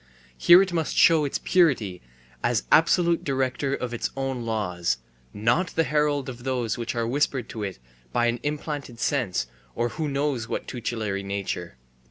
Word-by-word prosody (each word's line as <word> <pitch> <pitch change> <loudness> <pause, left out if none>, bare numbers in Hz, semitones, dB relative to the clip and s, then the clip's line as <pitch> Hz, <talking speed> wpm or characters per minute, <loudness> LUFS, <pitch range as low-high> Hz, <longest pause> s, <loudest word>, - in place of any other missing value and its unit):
Here 175 - +7
it 185 -2 -5
must 160 -2 -1
show 160 -3 +6
its 140 - -1
purity 125 - +2 0.4
as 120 -2 +1
absolute 170 +1 +4
director 135 0 0
of 125 -3 -4
its 120 - -2
own 135 -2 -2
laws, 90 - -1 0.3
not 120 - +1
the 165 - +3
herald 150 -3 +1
of 120 -2 -7
those 125 -4 -1
which 120 0 -4
are 115 -1 0
whispered 130 -1 0
to 115 - -6
it 100 -3 -4 0.3
by 120 - +2
an 120 0 0
implanted 145 -4 -4
sense 120 - 0 0.3
or 120 +1 0
who 155 +3 -3
knows 140 -4 -1
what - - -4
tutelary 110 -5 -3
nature. 100 -7 -4
125 Hz, 165 wpm, -25 LUFS, 110-145 Hz, 0.4 s, Here